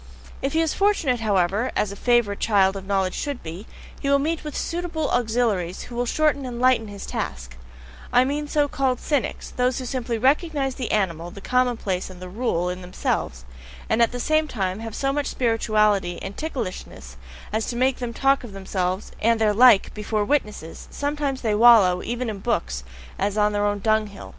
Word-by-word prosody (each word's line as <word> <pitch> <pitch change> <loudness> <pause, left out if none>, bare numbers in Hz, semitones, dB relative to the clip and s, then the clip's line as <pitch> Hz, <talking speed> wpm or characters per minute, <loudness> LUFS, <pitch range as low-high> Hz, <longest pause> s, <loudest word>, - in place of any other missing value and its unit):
If 275 - -1
he 320 - +3
is 325 -2 0
fortunate, 360 -11 +1
however, 205 +1 +1
as 205 - 0
a - - -7
favourite 240 -2 +2
child 195 -3 +3
of 195 -1 -7
knowledge 195 -2 0
should 285 -3 -4
be, 170 +6 -8 0.3
he 275 - -2
will 280 - +5
meet 315 +3 -1
with 300 -1 -5
suitable 335 -3 -2
auxiliaries 220 -7 0
who 240 - -10
will 245 0 -1
shorten 300 0 +1
and 245 -2 -5
lighten 250 -3 +3
his 200 -1 -8
task; 65 -1 -5 0.6
I 250 +1 +5
mean 295 +2 -2
so 290 0 +1
called 265 -2 0
cynics, 290 -5 -2
those 250 0 0
who 255 - -4
simply 245 -2 -2
recognize 275 +2 +1
the 250 -2 -4
animal, 175 -5 0
the 200 - -10
commonplace 235 -6 0
and 185 -1 -11
"the 185 0 -8
rule" 180 -4 -1
in 180 +1 -4
themselves, 120 - -3 0.5
and 235 - +3
at 230 - +4
the 245 - -5
same 310 +4 +1
time 190 -6 -2
have 225 -1 -6
so 275 0 0
much 290 -1 -1
spirituality 215 -6 +1
and 195 +1 -6
ticklishness 185 - -6 0.4
as 220 0 0
to 240 - -3
make 255 +2 +2
them 245 -2 -4
talk 270 +3 +2
of 230 -5 -9
themselves 190 0 -3
and 230 +1 +3
their 215 -1 +3
like 235 -2 +6
BEFORE 210 0 -1
WITNESSES 210 - -2
sometimes 285 -2 -2
they 220 -3 0
wallow, 210 -5 +6
even 240 +1 -3
in 210 -3 -4
books, 65 - -2 0.4
as 200 +2 -1
on 210 0 +3
their 205 0 +1
own 205 0 0
dung 215 +1 +1
hill. 200 -1 -11
225 Hz, 195 wpm, -23 LUFS, 195-265 Hz, 0.6 s, like